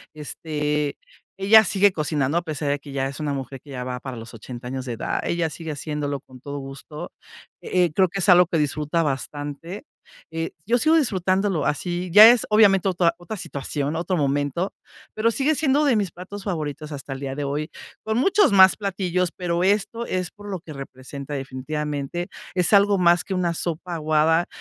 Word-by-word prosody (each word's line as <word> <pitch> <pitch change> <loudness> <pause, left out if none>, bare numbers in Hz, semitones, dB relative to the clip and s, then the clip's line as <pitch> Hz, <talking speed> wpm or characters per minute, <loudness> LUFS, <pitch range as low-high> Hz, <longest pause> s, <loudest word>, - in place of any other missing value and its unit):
este, 150 -1 -2 0.4
ella 210 +3 +7
sigue 200 +1 +3
cocinando 150 -3 -1
a - - -6
pesar 155 -3 -3
de 145 0 0
que 140 0 -11
ya 135 -1 -1
es 140 +2 -7
una 150 -2 -2
mujer 135 -1 -5
que 145 - -18
ya 125 -2 -5
va 125 0 -4
para 130 -1 -7
los 115 +1 -10
80 120 +2 -9
años 130 0 -4
de 125 - -4
edad. 115 - -2
Ella 170 -2 -1
sigue 165 0 -7
haciéndolo 145 -1 -3
con 130 -1 -16
todo 145 +1 -6
gusto. 140 +4 -8 0.5
Eh, 180 -3 +1
creo 190 +3 +4
que 195 +3 -4
es 190 - +2
algo 180 -1 +7
que 170 - 0
disfruta 150 +2 0
bastante. 145 +5 -4 0.5
Eh, 165 0 -3
yo 235 +3 +3
sigo 315 +5 +4
disfrutándolo 190 - +1
así, 175 +4 -2
ya 210 +5 +11
es 240 -1 +4
obviamente 200 -3 +5
otra 175 -2 +2
otra 175 +5 -7
situación, 145 -1 -4
otro 175 +2 -1
momento, 145 +5 -1 0.4
pero 225 +2 +1
sigue 280 +7 +1
siendo 290 0 +2
de 270 -5 +3
mis 200 -5 0
platos 190 +4 -9
favoritos 155 -5 -4
hasta 140 -1 -6
el 135 - -8
día 135 -1 -4
de 145 0 -3
hoy, 145 +2 -3 0.3
con 220 +1 -1
muchos 390 - +4
más 190 -1 +7
platillos. 185 -3 -1
Pero 175 -1 -2
esto 210 +4 +1
es 185 -4 -2
por 205 0 -12
lo 190 - -3
que 160 -2 -11
representa 140 +1 -8
definitivamente, 145 +4 -4 0.3
es 180 +2 +2
algo 200 0 +5
más 175 -2 +4
que 195 - -5
una 180 -2 0
sopa 170 +1 -4
aguada, 155 +2 +2
165 Hz, 195 wpm, -23 LUFS, 145-190 Hz, 0.5 s, ya